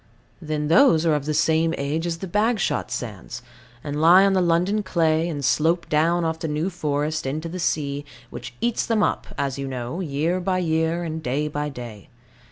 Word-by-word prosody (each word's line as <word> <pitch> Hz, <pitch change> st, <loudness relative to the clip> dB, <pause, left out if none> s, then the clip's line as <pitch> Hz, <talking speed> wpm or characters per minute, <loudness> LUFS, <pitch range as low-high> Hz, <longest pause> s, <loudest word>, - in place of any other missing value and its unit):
Then 155 Hz, -2 st, -2 dB
those 165 Hz, -, +5 dB
are 160 Hz, -, +3 dB
of 145 Hz, -2 st, -1 dB
the 155 Hz, -, -1 dB
same 160 Hz, +1 st, +2 dB
age 150 Hz, +4 st, -2 dB
as 165 Hz, -1 st, -2 dB
the 190 Hz, -, -6 dB
Bagshot 210 Hz, +3 st, 0 dB
sands, 115 Hz, +1 st, -6 dB, 0.4 s
and 145 Hz, 0 st, -3 dB
lie 180 Hz, +4 st, +7 dB
on 195 Hz, -, +3 dB
the 190 Hz, -, +3 dB
London 180 Hz, +5 st, +2 dB
clay, 165 Hz, -3 st, +1 dB
and 145 Hz, -4 st, -3 dB
slope 165 Hz, +6 st, +2 dB
down 165 Hz, +3 st, +2 dB
off 160 Hz, 0 st, -2 dB
the 160 Hz, -, -3 dB
New 155 Hz, +5 st, -1 dB
Forest 150 Hz, -3 st, -2 dB
into 155 Hz, +5 st, -3 dB
the 180 Hz, +2 st, -6 dB
sea, 145 Hz, -4 st, -1 dB, 0.3 s
which 125 Hz, +1 st, -8 dB
eats 235 Hz, -1 st, 0 dB
them 220 Hz, -2 st, +1 dB
up, -, -, -1 dB
as 140 Hz, -1 st, -2 dB
you 135 Hz, -, -3 dB
know, 125 Hz, +4 st, -4 dB
year 165 Hz, +2 st, -1 dB
by 185 Hz, 0 st, 0 dB
year 165 Hz, 0 st, 0 dB
and 160 Hz, -1 st, -4 dB
day 150 Hz, +2 st, -1 dB
by 150 Hz, 0 st, -3 dB
day. 120 Hz, -7 st, -9 dB
160 Hz, 195 wpm, -23 LUFS, 145-175 Hz, 0.4 s, lie